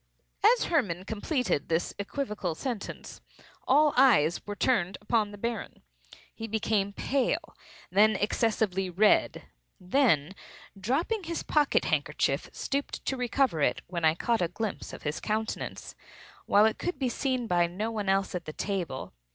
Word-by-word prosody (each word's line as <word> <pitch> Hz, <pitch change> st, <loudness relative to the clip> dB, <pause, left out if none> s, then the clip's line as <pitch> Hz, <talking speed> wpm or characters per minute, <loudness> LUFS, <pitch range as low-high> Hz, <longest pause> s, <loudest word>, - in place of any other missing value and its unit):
As 465 Hz, +4 st, +5 dB
Hermann 195 Hz, -, 0 dB
completed 220 Hz, -, -1 dB
this 165 Hz, +1 st, 0 dB
equivocal 205 Hz, -, -3 dB
sentence, 235 Hz, -, -6 dB, 0.5 s
all 295 Hz, +2 st, +5 dB
eyes 215 Hz, -, +4 dB
were 205 Hz, -, -4 dB
turned 195 Hz, -6 st, +1 dB
upon 210 Hz, 0 st, +1 dB
the 205 Hz, -, -10 dB
Baron. 230 Hz, +1 st, -5 dB, 0.5 s
He 225 Hz, 0 st, -6 dB
became 215 Hz, -2 st, 0 dB
pale, 260 Hz, +5 st, -1 dB, 0.4 s
then 215 Hz, +2 st, +5 dB
excessively 205 Hz, -2 st, 0 dB
red; 200 Hz, +4 st, +3 dB, 0.4 s
then, 185 Hz, -, +2 dB, 0.4 s
dropping 300 Hz, -, -1 dB
his 335 Hz, 0 st, -3 dB
pocket 295 Hz, -2 st, +2 dB
handkerchief, -, -, 0 dB
stooped 280 Hz, +1 st, -3 dB
to 265 Hz, -, 0 dB
recover 250 Hz, -, +1 dB
it, -, -, +1 dB
when 170 Hz, -2 st, -5 dB
I 160 Hz, 0 st, +4 dB
caught 230 Hz, +5 st, 0 dB
a 175 Hz, -, +2 dB
glimpse 210 Hz, +4 st, -5 dB
of -, -, -10 dB
his 150 Hz, +1 st, -2 dB
countenance, 220 Hz, 0 st, -3 dB, 0.5 s
while 205 Hz, +1 st, +6 dB
it 220 Hz, -, +1 dB
could 355 Hz, -4 st, -3 dB
be 265 Hz, -1 st, 0 dB
seen 255 Hz, 0 st, -1 dB
by 175 Hz, -4 st, +2 dB
no 205 Hz, +6 st, -3 dB
one 210 Hz, -3 st, -2 dB
else 195 Hz, 0 st, +1 dB
at 180 Hz, -2 st, -4 dB
the 155 Hz, -, -6 dB
table. 180 Hz, -10 st, -4 dB
215 Hz, 150 wpm, -28 LUFS, 185-255 Hz, 0.5 s, while